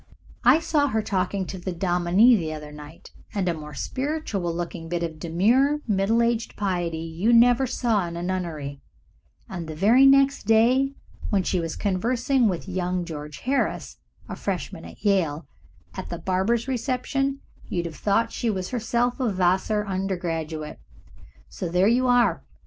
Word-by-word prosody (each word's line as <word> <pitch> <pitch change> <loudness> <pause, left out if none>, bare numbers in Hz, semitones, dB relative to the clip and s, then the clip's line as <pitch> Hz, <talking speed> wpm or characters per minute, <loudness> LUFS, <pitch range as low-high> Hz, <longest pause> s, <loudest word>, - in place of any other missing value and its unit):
I - - +6
saw 300 -3 +1
her 220 -5 -1
talking 190 -1 -1
to 185 - -7
the 185 +1 -4
dominie 180 +6 +4
the 165 -6 -2
other 150 -1 -8
night, 150 +2 -12 0.2
and 195 -3 0
a 175 - +2
more 150 -2 -9
spiritual 260 - -3
looking 170 -1 -5
bit 175 0 -2
of 160 -2 -5
demure 235 - +2
middle 215 +3 +2
aged 230 -1 -1
piety 175 -5 -1
you 165 +7 -1
never 245 +2 +5
saw 225 -7 0
in 170 0 -6
a 170 - -4
nunnery, 160 -7 -4 0.7
and 175 -4 -6
the 155 - -6
very 230 - +5
next 275 -4 +4
day 250 +5 +3 0.3
when 195 -3 +1
she 180 - 0
was 165 -2 -3
conversing 235 +6 +1
with 180 0 -4
young 180 -1 -2
George 150 -3 -8
Harris, 270 +2 -1 0.3
a - - -6
Freshman 165 -4 -4
at - - -13
Yale, 170 -6 +1 0.5
at - - -7
the - - -4
Barbers' 200 +6 0
reception, 270 +2 -1 0.3
you'd 175 -1 -2
have 165 -2 -6
thought 225 +3 +1
she 235 - -2
was 190 -3 -2
herself 240 +1 -1
a 250 -4 +1
Vassar 190 +3 +1
undergraduate. 170 -5 -3 0.7
So 180 - -5
there 180 +3 +3
you 250 +3 +3
are. 245 -1 +3
190 Hz, 160 wpm, -24 LUFS, 170-235 Hz, 0.7 s, I